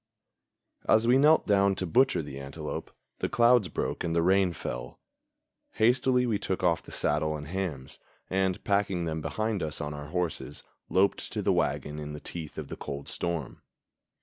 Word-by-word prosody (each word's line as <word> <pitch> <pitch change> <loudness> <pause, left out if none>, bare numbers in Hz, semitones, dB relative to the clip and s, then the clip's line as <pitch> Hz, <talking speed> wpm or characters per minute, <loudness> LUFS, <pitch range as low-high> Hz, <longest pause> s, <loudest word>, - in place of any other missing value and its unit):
As 110 +1 +5
we 125 +3 +5
knelt 155 +3 +5
down 100 -1 +3
to 95 - -2
butcher 95 0 +3
the 70 -2 -7
antelope, 70 0 -6 0.3
the - - -1
clouds 120 -3 +5
broke - - -3
and 85 -1 -1
the 85 - +3
rain 95 0 +4
fell. 60 -6 -6 0.7
Hastily 125 +2 +3
we 110 -4 0
took 95 -1 -2
off 85 -2 +3
the - - -13
saddle 75 0 0
and 75 0 -8
hams, 80 -7 -4 0.3
and, 95 -1 0
packing 100 -3 +1
them 80 -1 -2
behind 110 +3 -2
us 75 -2 -3
on 75 0 -3
our 75 0 -7
horses, 85 -3 -3 0.3
loped 95 +2 +1
to - - -2
the - - +3
wagon 75 +1 -1
in 75 0 -6
the 75 - -6
teeth 80 -1 -7
of - - -5
the - - -7
cold 70 0 -6
storm. 85 -6 -3
90 Hz, 175 wpm, -28 LUFS, 75-105 Hz, 0.7 s, As